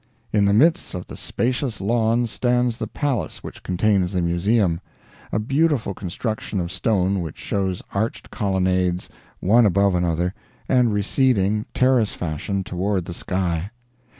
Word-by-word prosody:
In 105 -2 +4
the 100 - +4
midst 155 - +3
of 90 - -5
the - - -9
spacious 125 -1 -2
lawns 115 +2 +1
stands 125 -1 +1
the - - -2
palace 140 -6 -2
which - - -9
contains 95 0 +1
the 90 - +1
museum 85 +1 +1 0.5
a - - 0
beautiful 135 0 +1
construction 105 +3 -3
of 85 0 -3
stone 95 -1 +1
which 80 -3 -6
shows 95 -2 -2
arched 110 +4 -2
colonnades, 95 -2 0 0.3
one 110 +4 +5
above 100 +1 +3
another, 90 0 0 0.3
and 125 -3 +3
receding, 105 -1 +1
terrace 125 -4 +3
fashion, 90 +4 -3
toward 95 0 -1
the 85 - -6
sky. 90 0 -2
100 Hz, 140 wpm, -22 LUFS, 90-115 Hz, 0.5 s, one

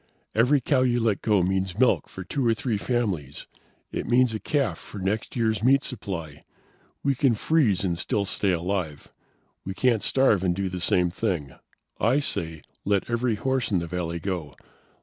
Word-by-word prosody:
"Every 125 +6 +4
cow 130 +1 +2
you 120 -1 +2
let 110 -4 +1
go 105 -4 +3
means 95 0 -1
milk 125 +1 +3
for 95 - -8
two 135 +10 -2
or 115 - +3
three 110 -2 -2
families. 95 - -2 0.5
It - - -4
means 125 -1 +3
a 110 - -3
calf 135 - -1
for - - -11
next 100 +3 -2
year's 110 -3 +1
meat 135 +4 +4
supply. 85 - -6 0.6
We 140 - +2
can 135 -3 +2
freeze 110 - +2
and 85 -2 -1
still 100 - 0
stay 100 +1 +1
alive. 85 -4 -2 0.5
We 95 - -5
can't 120 -1 +2
starve 120 -8 +3
and 90 -2 +1
do 95 0 -1
the 90 -1 -5
same 90 0 +2
thing. 85 - -2 0.5
I 120 +5 +3
say, 80 - -2 0.2
let 100 +3 0
every 120 -1 +1
horse 130 +2 -1
in 100 - +2
the 85 - -1
valley 85 0 -3
go. 85 -5 -4
100 Hz, 180 wpm, -25 LUFS, 90-120 Hz, 0.6 s, Every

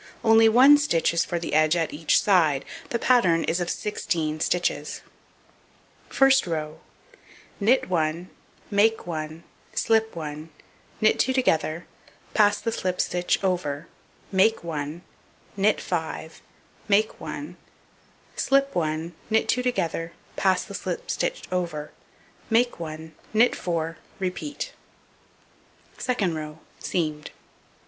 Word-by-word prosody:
Only 225 0 +6
1 265 +6 +7
stitch 170 - +1
is 170 - +2
for 175 - -3
the 170 - -4
edge 155 +2 +4
at 165 -2 -1
each 155 +1 +2
side, 160 -9 +3 0.2
the 235 - 0
pattern 190 -10 +3
is 170 - 0
of 175 - -2
16 160 -7 -2
stitches. 155 -4 -1 1.1
First 270 -5 +4
row: 155 -1 -3 0.8
Knit 230 +6 +3
1, 170 0 -1 0.4
make 220 +2 +3
1, 155 -1 -5 0.3
slip 220 -2 +2
1, 155 0 -6 0.5
knit 215 - +4
2 260 - +2
together, 165 -9 +1 0.5
pass 205 -1 +4
the 230 - -2
slipped 185 -4 -2
stitch 175 0 0
over, 170 -5 -1 0.4
make 200 +3 +3
1, 155 +1 -5 0.5
knit 205 +2 +2
5, 160 -2 -4 0.5
make 215 +1 +2
1, 155 +5 -6 0.8
slip 275 0 +2
1, 160 0 -2 0.2
knit 220 0 +2
2 250 - +2
together, 170 -9 -2 0.2
pass 185 -2 +2
the - - -10
slipped - - -4
stitch - - -2
over, 165 -5 -3 0.6
make 240 -1 +2
1, 160 -1 -7 0.2
knit 235 +3 +5
4; 165 -2 -3 0.2
repeat. 285 - -4 1.3
Second 215 -9 0
row: 155 -1 -6 0.2
Seamed. 155 -3 -2
175 Hz, 120 wpm, -25 LUFS, 160-220 Hz, 1.3 s, 1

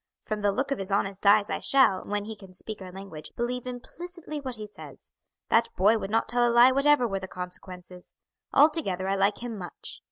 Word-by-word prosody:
From 215 -1 -3
the 205 0 +3
look 265 +7 -2
of 275 - -1
his 195 - -5
honest 200 0 0
eyes 205 +1 +5
I - - -1
shall, 265 -9 +3
when 205 0 -3
he 220 0 -6
can 195 -3 -14
speak 215 +2 -7
our 185 -1 -8
language, 180 -5 -9
believe 245 +1 -2
implicitly 310 +5 -7
what 260 -3 -2
he 215 -1 -6
says. 210 - -13 0.4
That 230 +1 +3
boy 210 +4 +4
would 195 - -5
not 225 +2 +1
tell 240 +1 +1
a 240 - +4
lie 240 +2 +7
whatever 275 -1 +4
were 195 -3 -2
the 190 - -7
consequences. 180 0 -9 0.4
Altogether 280 - +3
I 195 - +1
like 200 +3 +1
him 240 -2 -4
much. 175 -2 -7
210 Hz, 215 wpm, -27 LUFS, 195-245 Hz, 0.4 s, lie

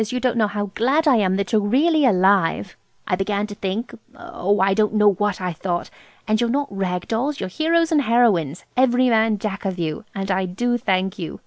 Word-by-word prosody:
you 250 - -2
don't 250 0 0
know 215 -2 +3
how 205 -1 -4
glad 280 +9 +1
I 265 -5 +5
am 190 -3 +1
that 200 +4 -3
you're 215 -2 +3
really 290 +8 +2
alive! 190 -3 +2 0.3
I 180 - +1
began 200 +2 -1
to 210 - -8
think–oh–I 200 - -2
don't 215 +1 +1
know 210 -1 +5
what 205 0 -2
I 180 -2 -3
thought! 175 +1 -4 0.4
And 215 +1 +1
you're 235 - +1
not 280 -3 -2
rag 180 -2 -3
dolls. 270 +6 -2
You're - - -4
heroes 330 - +1
and 305 -2 +3
heroines, 215 - +1
every 255 0 +3
man 220 -1 +2
jack 200 -1 -5
of 190 -2 -3
you. 160 +3 -3
And 195 0 -3
I 190 0 0
do 240 +7 -1
thank 190 -1 -1
you. 165 - -6
210 Hz, 205 wpm, -21 LUFS, 190-245 Hz, 0.4 s, I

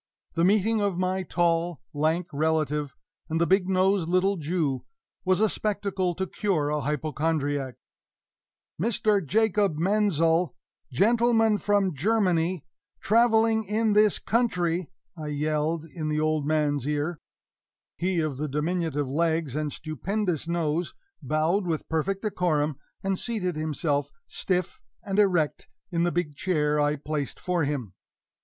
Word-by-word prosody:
The 165 - +1
meeting 210 +3 +3
of 200 -3 0
my 185 +1 0
tall, 170 -2 0
lank 160 +4 +1
relative 150 -1 0 0.3
and 160 +1 0
the 170 - +3
big 190 +1 +2
nosed 185 -2 +2
little 185 +3 +2
Jew 155 -4 -1 0.4
was 185 0 +3
a 220 - +4
spectacle 195 -4 -1
to 190 - -1
cure 175 -6 -1
a 150 0 0
hypochondriac! 145 -2 -1 1.1
"Mr. 210 -2 +2
Jacob 205 -1 +2
Menzel 175 -2 +2 0.4
gentleman 225 - +3
from 200 -3 +1
Germany 180 -1 +1 0.3
traveling 225 0 +3
in 215 +2 +1
this 210 -1 +4
country," 180 -8 0 0.3
I 155 -3 -6
yelled 150 +2 -1
in 160 -1 -5
the 150 0 0
old 155 -1 0
fellow's 150 -3 +1
ear. 150 +2 -1 0.8
He 180 0 0
of 155 -4 -2
the 150 +2 -2
diminutive 150 0 -1
legs 160 0 0
and 150 -1 -1
stupendous 170 - -2
nose 170 0 -1 0.3
bowed 165 +6 +1
with 160 -2 -2
perfect 190 +6 -1
decorum, 155 -8 0 0.2
and 195 -1 0
seated 200 -8 -2
himself, 155 -1 -1 0.2
stiff 185 - -2 0.2
and 195 +1 -1
erect, 180 -7 +2 0.2
in 170 0 +1
the 175 - +1
big 170 -4 -2
chair 150 -3 +1
I 145 0 +2
placed 150 -1 -4
for 175 -4 0
him. 130 -9 -3
170 Hz, 135 wpm, -26 LUFS, 150-195 Hz, 1.1 s, a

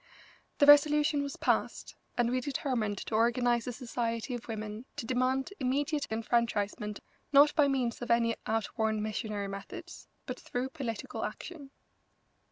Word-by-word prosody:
The 285 - +5
resolution 295 +1 +6
was 280 -1 -4
passed, - - 0 0.2
and 240 -1 +2
we 255 0 +1
determined 245 -6 -1
to 220 - -6
organise 235 +1 +2
a - - -1
society 235 -1 -3
of 240 -1 -6
women 215 +1 -5
to - - -5
demand 260 - 0
immediate 285 +3 0
enfranchisement, 220 -2 -1 0.3
not 290 +1 +7
by 295 -3 +4
means 255 -4 0
of 245 - -5
any 230 -1 +3
outworn 220 0 0
missionary 215 -1 -3
methods, 340 - -8 0.2
but - - -5
through 250 +2 -3
political 255 -7 -5
action. 300 -6 -6
245 Hz, 140 wpm, -31 LUFS, 225-280 Hz, 0.3 s, not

